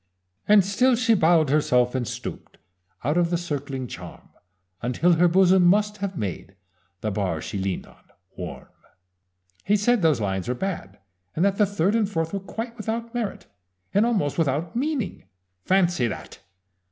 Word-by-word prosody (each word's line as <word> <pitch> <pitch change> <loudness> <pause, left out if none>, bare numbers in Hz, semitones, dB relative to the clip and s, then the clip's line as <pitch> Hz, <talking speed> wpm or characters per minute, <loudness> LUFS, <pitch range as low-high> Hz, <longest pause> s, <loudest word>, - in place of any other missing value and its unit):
"And 205 -3 +6
still 250 +6 +3
she 235 -1 +3
bowed 160 -6 +4
herself 125 -5 +3
and 125 -3 -2
stooped - - -7 0.5
Out 150 +6 +1
of 170 -1 +2
the 175 - +1
circling 140 -6 -4
charm - - -10 0.5
Until 145 +9 +2
her 175 +2 +4
bosom 185 +1 +5
must 210 +4 +3
have 200 -2 -4
made 100 -1 -5 0.5
The 110 - -1
bar 95 -5 -1
she 100 - -5
leaned 95 -1 -2
on - - -21 0.3
warm. - - -8 0.9
He 210 +2 +3
said 235 +2 +2
those 155 -7 +3
lines 95 -3 -2
were 125 - -1
bad, 125 - -4 0.4
and 170 - +2
that 200 0 +1
the 210 - +4
third 195 0 +1
and 215 -3 +1
fourth 165 -4 -2
were 200 - -1
quite 225 +5 -6
without 230 +2 -4
merit, 235 -4 -3 0.5
and 205 - +4
almost 200 - 0
without 160 +3 0
meaning! 270 -4 -2 0.4
Fancy 175 -9 +2
that! 115 - -7
175 Hz, 165 wpm, -24 LUFS, 135-205 Hz, 0.9 s, And